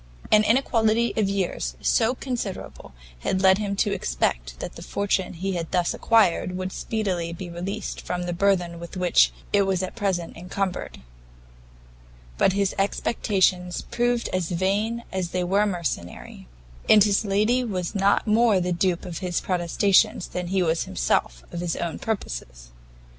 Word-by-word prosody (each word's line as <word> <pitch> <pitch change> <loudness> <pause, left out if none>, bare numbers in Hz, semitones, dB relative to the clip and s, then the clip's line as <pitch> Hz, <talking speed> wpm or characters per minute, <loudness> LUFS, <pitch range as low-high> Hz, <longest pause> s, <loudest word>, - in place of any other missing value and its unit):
An 215 0 +6
inequality 230 -1 +2
of 210 -3 +1
years 175 - -2
so 230 +3 +2
considerable, 240 -8 -5 0.3
had 190 - -1
led 190 +1 +6
him 200 -2 -2
to 200 +1 +1
expect - - -2
that - - -6
the - - -10
fortune 200 -2 -1
he 190 +3 -3
had 170 -2 -3
thus 180 -1 +1
acquired, 185 -5 +2
would 185 0 -3
speedily 185 -7 -2
be 175 +1 -7
released 195 +4 -5
from 180 0 -3
the 175 0 -3
burthen 180 -2 +1
with 170 +2 -8
which 180 -1 +4 0.2
it 205 - +5
was 190 -1 0
at 185 - -5
present 190 -6 -2
incumbered; 180 - -4 1.4
but 190 - +4
his 200 -1 +1
expectations 190 -3 +1
proved 240 0 +1
as 185 -3 -1
vain 200 +6 0
as 185 -2 -2
they 180 0 -1
were 200 +4 +2
mercenary, 90 - -5 0.4
and 210 -2 +8
his 205 0 +2
lady 215 +5 +2
was 185 -6 -3
not 200 0 +2
more 220 -2 +4
the 180 0 0
dupe 175 +1 0
of 175 -3 -5
his 180 -2 -1
protestations 185 +1 +2
than 180 -1 -4
he 190 +1 +1
was 165 -1 0
himself - - -1
of 170 - -5
his 175 -2 -1
own 170 -1 -3
purposes. - - -5
190 Hz, 160 wpm, -24 LUFS, 175-205 Hz, 1.4 s, and